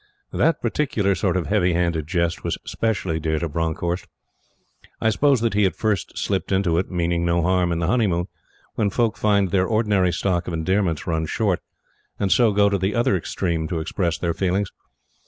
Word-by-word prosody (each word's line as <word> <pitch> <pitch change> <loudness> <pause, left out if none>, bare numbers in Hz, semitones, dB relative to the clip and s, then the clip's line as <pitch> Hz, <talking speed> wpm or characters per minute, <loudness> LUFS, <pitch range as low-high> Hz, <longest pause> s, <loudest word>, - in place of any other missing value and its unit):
That 165 -1 +2
particular 120 -5 +1
sort 95 -1 0
of 90 - -1
heavy 90 -4 +2
handed 85 -3 0
jest 85 -1 -1
was - - -2
specially 95 -8 -1
dear 80 0 -1
to 85 - -2
Bronckhorst. 80 +3 -2 0.9
I 110 - +2
suppose 140 +1 +3
that 115 -2 +1
he 105 - +2
had 95 - +1
first 105 -5 -2
slipped - - -2
into 95 -4 +2
it, 95 - -3
meaning 85 -1 0
no 85 0 +1
harm, 90 0 +2
in 85 - 0
the 85 - -1
honeymoon, 95 -4 +1 0.5
when 105 -2 0
folk 115 +1 0
find 100 -3 +2
their 95 0 +2
ordinary 105 -5 +2
stock 90 0 -1
of 90 - -3
endearments 85 -1 0
run 80 -2 -1
short, 100 0 0 0.6
and 100 -2 0
so 120 -3 +5
go 100 0 +4
to 100 -1 +1
the 95 +3 -1
other 120 -3 +2
extreme 85 -2 -2
to 85 -2 -2
express 85 +1 -1
their 85 -1 -1
feelings. 95 +2 -1
95 Hz, 190 wpm, -22 LUFS, 85-105 Hz, 0.9 s, so